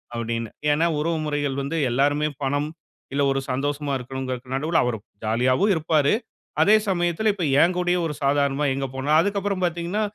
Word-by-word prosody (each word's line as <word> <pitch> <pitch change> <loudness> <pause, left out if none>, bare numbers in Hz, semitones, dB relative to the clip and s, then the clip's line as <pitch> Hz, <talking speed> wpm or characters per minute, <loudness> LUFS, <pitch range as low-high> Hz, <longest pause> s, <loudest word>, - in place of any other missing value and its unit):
அப்படின்னு. 115 -1 -3 0.2
ஏன்னா, 155 +3 +2
உறவு 165 +2 0
முறைகள் 145 -2 -1
வந்து 140 +4 -3
எல்லாருமே 145 +4 +2 0.2
பணம், 145 +2 0 0.4
இல்ல 140 - +1
ஒரு 135 - 0
சந்தோஷமா 145 +2 -2
இருக்கணும்ங்கிறதுக்கு 130 0 -5
நடுவுல 160 +4 +1
அவர் 120 -2 -1 0.3
ஜாலியாவும் 130 - +2
இருப்பாரு, 155 -2 +2 0.5
அதே 210 - +6
சமயத்தில, 175 +3 +1
இப்ப 195 -3 -4 0.2
என் 175 +2 +4
கூடயும் 180 -1 +1
ஒரு 150 - -4
சாதாரணமா 140 +1 +1
எங்க 135 0 -2
போனா 135 +3 -2
அதுக்கப்பறம் 200 0 -1
பார்த்தீங்கன்னா, 175 +4 -2
145 Hz, 155 wpm, -23 LUFS, 135-170 Hz, 0.5 s, அதே